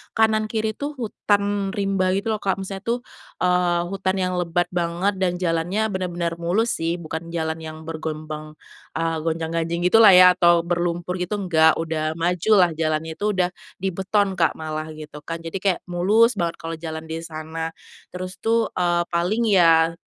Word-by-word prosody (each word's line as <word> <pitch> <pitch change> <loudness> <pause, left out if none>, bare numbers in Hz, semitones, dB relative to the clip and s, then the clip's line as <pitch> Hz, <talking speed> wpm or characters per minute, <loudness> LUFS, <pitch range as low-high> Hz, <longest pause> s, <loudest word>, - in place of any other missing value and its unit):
kanan 220 -1 +3
kiri 220 0 -1
itu 290 +1 -4
hutan 205 -4 -1
rimba 195 -2 +1
gitu 200 +3 -1
loh, 215 - -1
Kak, 195 - 0
maksudnya 195 0 -5
tuh, 240 +1 +1 0.4
eee, 180 -1 +2
hutan 195 -1 -1
yang 185 -1 -1
lebat 175 0 0
banget 175 +3 -1
dan 180 -2 +1
jalannya 180 +5 0
benar-benar 175 -3 -3
mulus 200 +8 +1
sih, 165 +1 0
bukan 165 0 -6
jalan 160 -1 -1
yang 155 0 -8
bergelombang, 155 -1 -6 0.4
eee, 165 0 -1
gonjang-ganjing 165 +1 -2
gitu 225 - +7
lah 215 -3 +9
ya 180 0 +9
atau 170 -1 +4
berlumpur 175 +1 -2
gitu, 180 +4 -2
enggak. 160 -5 +4
Udah 160 -1 -2
maju 175 +4 0
lah, 175 - +4
jalannya 160 0 -1
itu 210 +1 0
udah 180 -2 +1 0.3
dibeton, 190 +1 0
Kak, 165 -2 +3
malah 155 0 -4
gitu 150 -1 -10
kan, 165 +1 -5
jadi 165 +1 -8
kayak 190 -3 +2
mulus 210 +7 +3
banget 170 -4 -2
kalau 165 0 -5
jalan 160 0 -7
di 160 +1 -5
sana. 160 0 -5 0.4
Terus 185 +1 -6
tuh, 230 0 +2
eee, 175 -1 +1
paling 185 +7 0
ya 165 -4 +5
175 Hz, 170 wpm, -23 LUFS, 165-195 Hz, 0.4 s, lah